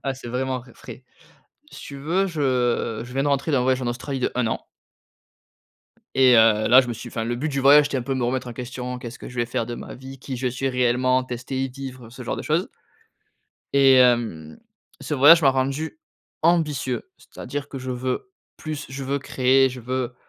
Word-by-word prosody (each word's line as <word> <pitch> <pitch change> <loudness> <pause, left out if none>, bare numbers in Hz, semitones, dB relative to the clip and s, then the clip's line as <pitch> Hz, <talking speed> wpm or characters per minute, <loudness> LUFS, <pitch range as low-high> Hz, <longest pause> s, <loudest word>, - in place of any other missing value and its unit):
Ah, 135 - +1
c'est 130 -2 -10
vraiment 130 +1 -2
v 120 0 -17
frais. 130 - -11 0.7
Si - - -11
tu 140 - -9
veux 170 +8 0
je 125 - 0
je 120 +1 -10
viens 135 - +1
de 145 - +1
rentrer 140 +2 0
d'un 130 -3 +3
voyage 130 0 +1
en 125 - -2
Australie 130 +3 -4
de - - 0
1 125 -2 0
an 115 - -3 1.5
et 130 -1 +6
heu, 110 -1 +4
là, 125 +2 +8
je 125 - -4
me 120 - -2
suis 120 +2 -8
enfin, 115 -1 -4
le 120 +1 -2
but 150 +5 -2
du 140 -1 -2
voyage 145 +2 +7
c'étais 140 - -3
un - - -3
peu 135 +2 -2
me 125 -2 -1
remettre 125 +1 -1
en - - -6
question: 125 +1 -6
«Qu'est-ce 120 -1 -8
que - - -9
je 125 - -12
vais 120 0 0
faire 115 -1 -2
de 120 - -5
ma - - -8
vie? 135 +1 -11
Qui 130 0 -6
je 130 +1 -3
suis 130 +2 -2
réellement?» 125 0 +2
tester 130 +2 -4
y - - -3
vivre, 130 -2 -9
ce 125 +2 -10
genre - - -3
de - - -5
choses - - 0 1.0
et 135 -1 +6
hem, 120 -12 +2 0.4
ce - - -3
voyage 155 +5 +7
m'a 135 - +6
rendu 135 - -2 0.4
ambitieux. 150 -7 +1 0.2
C'est - - -15
à - - -7
dire 145 0 -4
que, 135 - -7
je 130 0 -6
veux 130 - -3 0.3
plus. 155 -1 -6
Je 135 +1 -6
veux 140 +2 -1
créer. 135 0 +3
Je 125 0 -8
veux 125 0 -3
130 Hz, 225 wpm, -23 LUFS, 125-135 Hz, 1.5 s, là